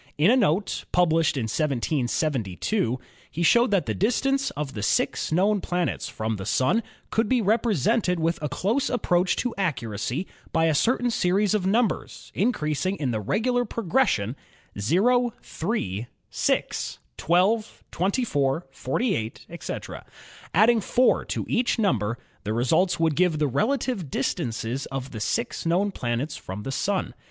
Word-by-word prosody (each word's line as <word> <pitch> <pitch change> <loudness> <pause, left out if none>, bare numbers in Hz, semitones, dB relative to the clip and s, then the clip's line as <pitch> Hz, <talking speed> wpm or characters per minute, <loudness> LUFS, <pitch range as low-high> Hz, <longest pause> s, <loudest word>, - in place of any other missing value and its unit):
In 160 +9 +5
a - - +5
note, 200 -5 +1
published 165 -4 +3
in 130 - 0
1772, 130 - -1 0.3
he 170 - -3
showed 235 +8 +5
that 195 -3 +2
the - - -1
distance 270 +6 +1
of 145 -2 -3
the 105 - -5
six - - 0
known 195 +5 +2
planets 180 -1 -2
from 110 0 -3
the 95 - -6
Sun 130 - +2 0.3
could 225 -1 +1
be 255 - +3
represented 215 - +2
with 165 +1 0
a 150 - -2
close 210 - 0
approach 180 -7 +1
to 245 -2 -2
accuracy 130 - -2 0.3
by 165 0 +2
a 160 - +3
certain 245 - +2
series 195 0 +2
of 195 -3 +1
numbers 225 +1 -1
increasing 185 - 0
in 140 -9 -2
the 110 - -1
regular 245 - +1
pro 230 0 -5
gression, 165 - +2 0.7
o, 245 -1 +3
3, 120 - -3 0.2
6, - - -1 0.2
12, 195 +6 +1
24, 170 - 0
48, 135 - -2
etc. - - -6 0.5
Adding 220 +5 +4
4 250 +5 +2
to - - -3
each 240 +1 +1
number, 120 - +1 0.3
the 105 +1 -2
results 130 +11 +2
would 160 -2 +2
give 175 -2 +2
the 150 - +2
relative 215 - 0
distances 120 +1 -2
of 135 0 -5
the 110 - -6
six 105 +3 -2
known 180 +5 +1
planets 125 -1 -2
from 95 +3 -7
the 135 - -4
Sun. 190 +7 -1
175 Hz, 145 wpm, -25 LUFS, 135-220 Hz, 0.7 s, In